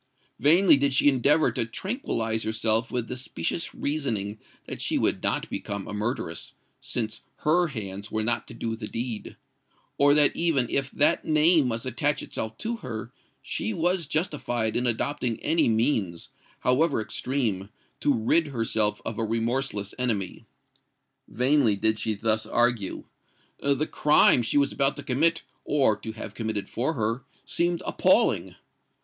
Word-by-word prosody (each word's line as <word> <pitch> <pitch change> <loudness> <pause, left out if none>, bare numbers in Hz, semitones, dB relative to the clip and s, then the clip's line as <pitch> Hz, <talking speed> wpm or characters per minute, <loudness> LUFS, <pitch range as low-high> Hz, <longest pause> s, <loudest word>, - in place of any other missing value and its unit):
Vainly 160 - +5
did 140 -1 +1
she 130 - +4
endeavour 145 +4 +3
to - - -1
tranquillise 115 - -2
herself 110 +1 0
with 120 -2 -2
the 125 - -5
specious 130 - -3
reasoning 110 -9 -2 0.3
that - - -6
she - - 0
would - - +1
not - - -1
become 100 -1 -5
a - - -5
murderess, 105 -6 -3 0.2
since 110 -2 -2 0.2
her 175 +3 +3
hands 105 -6 -6
were 110 0 -1
not 120 - 0
to 115 - -9
do 115 -1 -3
the 110 -1 -6
deed,—or 125 +4 -3
that 150 -1 +5
even 160 -8 +2
if 135 0 +1
that 145 - +3
name 155 -1 +4
must 115 0 -2
attach 140 +4 0
itself 110 0 -5
to 230 +1 -3
her, - - -7 0.3
she 220 - -3
was 175 -1 0
justified 135 - -1
in 125 +1 +1
adopting 120 0 -1
any 160 -5 +2
means, 110 - 0 0.3
however 140 +4 +2
extreme, 110 -3 -2 0.3
to 145 - +2
rid 140 +7 +2
herself 110 -5 -1
of 110 - -4
a - - 0
remorseless 115 -1 -2
enemy:—vainly 125 +3 -2
did 110 +2 0
she 110 0 -1
thus 110 +1 0
argue:—the 120 +5 -2
crime 150 -5 +5
she 120 - 0
was 140 -1 +3
about 140 0 +1
to - - -7
commit, 155 +5 +1 0.2
or 135 -7 +2
to 110 +1 -7
have 110 - -8
committed 110 -3 -3
for 130 +8 -1
her, 115 -1 -2 0.2
seemed 175 0 0
appalling! - - +2
120 Hz, 145 wpm, -26 LUFS, 110-145 Hz, 0.3 s, Vainly